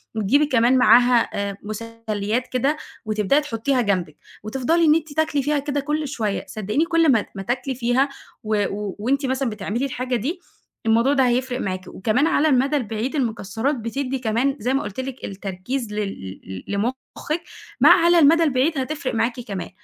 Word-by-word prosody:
وتجيبي 235 +8 +3
كمان 255 -2 +3
معاها 245 0 +5
آآ، 200 -1 -3
مُسلّيات 220 +1 -3
كده، 275 +4 0 0.3
وتبدئي 215 +7 +2
تحطّيها 250 -1 0
جنبك، 185 -8 -1 0.3
وتفضلي 270 +9 +1
إن 300 - +6
أنتِ 315 -2 -2
تاكلي 305 -3 +1
فيها 295 +1 +1
كده 285 0 -2
كُلّ 300 +2 -2
شويّة، 215 -7 -2
صدّقيني 215 +9 -1
كل 330 -3 +3
ما 225 -4 +2
ما 195 - -5
تاكلي 255 +4 -2
فيها، 245 +3 +1 0.3
و 215 -1 +1
و 205 -2 -4
وأنتِ 275 +6 0
مثلًا 265 -1 0
بتعملي 215 +5 -3
الحاجة 255 -1 -2
دي، 280 - -2 0.5
الموضوع 230 +5 +3
ده 265 -3 +3
هيفرِق 250 +1 0
معاكِ 185 -3 -4
وكمان 225 +10 +1
على 315 -2 +3
المدى 270 +2 +2
البعيد 235 +1 -2
المكسّرات 230 +1 -1
بتدّي 260 +3 -3
كمان 250 +4 0
زي 250 +4 0
ما 275 - +1
قُلت 210 0 -6
لِك 260 -1 -5
التركيز 200 +5 -5
لل 195 - -5 0.3
ل - - -4
لمُخِّك 260 +9 -3 0.4
مع - - +8 0.2
على 345 0 +6
المدى 330 +2 +6
البعيد 290 +2 +1
هتفرق 270 0 -3
معاكِ 230 +2 0
كمان، 200 -6 -5
250 Hz, 170 wpm, -22 LUFS, 215-280 Hz, 0.5 s, مع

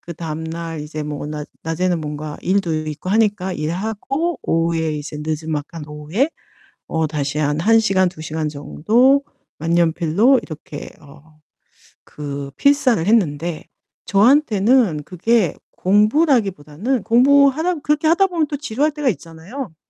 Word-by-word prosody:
그다음 160 -2 -6
날 165 -1 -5
이제 150 +1 -5
뭐 150 -1 -5
낮 150 -1 -5 0.2
낮에는 170 +2 -1
뭔가 150 0 -5
일도 185 -3 0
있고 155 +4 -5
하니까 205 -3 +1
일하고 220 - -2
오후에 165 -1 0
이제 150 +1 -6
느즈막한 155 0 -4
오후에 155 - -1 0.6
어 160 -1 0
다시 150 -1 -3
한 150 0 0
1 225 +6 +5
시간, 190 -4 +2
2 155 -3 -10
시간 155 0 -3
정도 230 - +2 0.4
만년필로 170 - +3
이렇게 155 -2 -9
어 150 +2 -18 0.7
그 140 -1 -6
필사를 260 - +3
했는데 170 -6 +1 0.4
저한테는 220 - +3
그게 185 +2 +1 0.2
공부라기보다는 210 - +1
공부하다 280 +7 +4
그렇게 300 +1 +1
하다 360 +5 +4
보면 335 -4 0
또 290 - -4
지루할 285 +2 0
때가 295 -3 0
있잖아요. 170 - -7
175 Hz, 285 characters per minute, -20 LUFS, 155-240 Hz, 0.7 s, 1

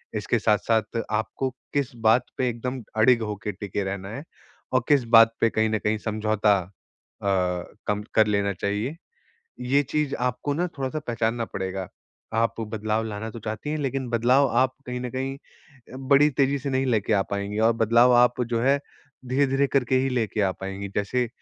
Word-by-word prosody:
इसके - - 0
साथ-साथ 110 +1 +1
आपको 110 +5 -1 0.2
किस 140 -2 0 0.2
बात 120 +3 +5
पे 130 - +1
एकदम 125 +2 -4
अड़िग 115 +2 +5
होके 105 -1 -4
टिके 100 +1 -4
रहना 95 0 -4
है 135 +7 -6 0.5
और 130 -1 +3
किस 145 -3 +5
बात 115 0 +7
पे 115 - +4
कहीं 110 0 +1
न 110 0 0
कहीं 105 +2 0
समझौता 110 -1 +1
अ 95 +2 -12
अ, 90 -2 0 0.2
कम 105 0 -1
कर 110 -1 +5
लेना 100 -1 +1
चाहिए। 105 - -2 0.7
ये 130 +3 +3
चीज़ 145 +1 -1
आपको 125 +3 -1
ना 175 +5 0
थोड़ा-सा 135 +3 -2
पहचानना 115 0 -1
पड़ेगा। 95 -2 -4 0.5
आप 115 0 +1
बदलाव 110 0 -2
लाना 110 0 -5
तो 115 - -8
चाहती 110 +6 -5
हैं 155 - -1
लेकिन 135 -2 -2
बदलाव 125 +4 +3
आप 130 0 +3
कहीं 125 0 -3
न 125 - -4
कहीं 135 +1 -3 0.7
बड़ी 140 +1 +6
तेजी 140 0 +1
से 140 +1 -4
नहीं 135 0 0
लेकर 110 -3 +1
आ 100 - +3
पाएँगी 100 +1 -3
और - - +4
बदलाव 115 +2 +4
आप 125 +1 +4
जो 115 - +1
है 140 +2 +3 0.5
धीरे-धीरे 135 +1 +2
करके 130 -2 +1
ही 135 - 0
लेेके 115 -4 -1
आ 95 - +2
पाएँगी। 95 +1 -5
जैसे 120 +4 0
115 Hz, 180 wpm, -25 LUFS, 105-130 Hz, 0.7 s, बात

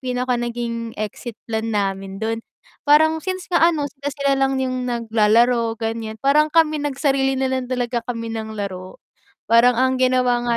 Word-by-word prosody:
pinaka 250 -1 -1
naging 235 -1 -4
exit 215 +2 -5
plan 220 0 -2
namin 195 -1 -2
dun, 225 +1 -2 0.4
parang 315 +2 +4
since 370 -1 -4
nga 345 - +3
ano, 295 -3 -2
sila-sila 280 0 -2
lang 270 0 +1
yung 255 -1 -2
naglalaro 230 0 +2
ganyan, 225 -1 -4
parang 300 +4 +3
kami 310 -2 +3
nagsarili 270 -1 0
nalang 260 -1 -1
talaga 245 -1 -1
kami 230 -2 -4
ng 220 -1 -5
laro, 185 -2 -6 0.5
parang 235 +2 +6
ang 260 +1 +2
ginawa 255 -1 +2
nga 235 -1 +1
245 Hz, 155 wpm, -21 LUFS, 225-270 Hz, 0.5 s, parang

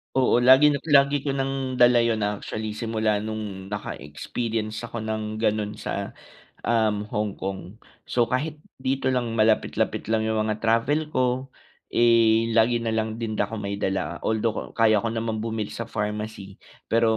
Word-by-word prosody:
Oo 125 -2 +4
lagi 130 +4 +7
na 140 - -1
lagi 140 0 +5
ko 140 0 -2
ng 135 -1 -2
dala 120 -1 +6
yun 115 -2 +1
actually 105 +1 -3
simula 110 -1 0
nung 105 -3 -5
naka-experience 110 - -4
ako 115 -1 -5
ng 110 0 -3
ganun 105 -1 0
sa, - - -5 0.5
um, 110 -3 +1
Hong 105 -1 -1
Kong, 95 +2 -6 0.2
so 120 -2 +1
kahit 150 +4 -2 0.2
dito 130 0 -1
lang 125 -3 0
malapit-lapit 110 0 +1
lang 110 0 +1
'yung 110 - 0
mga 110 0 -2
travel 120 +8 +1
ko, 130 -1 0 0.4
eh 115 -1 +4
lagi 115 +1 +4
na 110 - 0
lang 110 0 -1
din 115 -2 -3
ako 105 +1 -1
may 100 -1 -4
dala. 95 -3 -2
Although 110 0 -2
kaya 110 -2 +4
ko 115 - -2
naman 115 -1 -2
bumili 110 -2 -3
sa 115 0 -5
pharmacy, 105 -2 -4 0.2
pero 115 -1 +2
110 Hz, 155 wpm, -25 LUFS, 105-120 Hz, 0.5 s, lagi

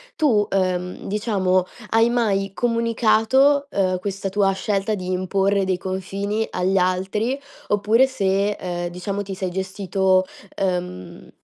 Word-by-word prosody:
tu, 235 -10 +2
uhm, 180 -2 -1
diciamo, 195 -3 +1 0.2
hai 225 +1 +4
mai 200 -5 0
comunicato, 235 +4 +3
uhm, 185 -5 0
questa 195 0 -3
tua 195 0 +2
scelta 195 +2 -1
di 185 -2 -4
imporre 195 +2 +1
dei 190 -1 0
confini 195 +4 -3
agli 190 +2 0
altri 190 +8 0 0.3
oppure 215 +5 +3
se, 200 -5 +1
ehm, 175 -3 -4
diciamo, 190 +3 -4
ti 195 -1 -6
sei 185 -1 -3
gestito 190 0 +1 0.3
ehm, 180 - -3
195 Hz, 125 wpm, -22 LUFS, 185-215 Hz, 0.3 s, hai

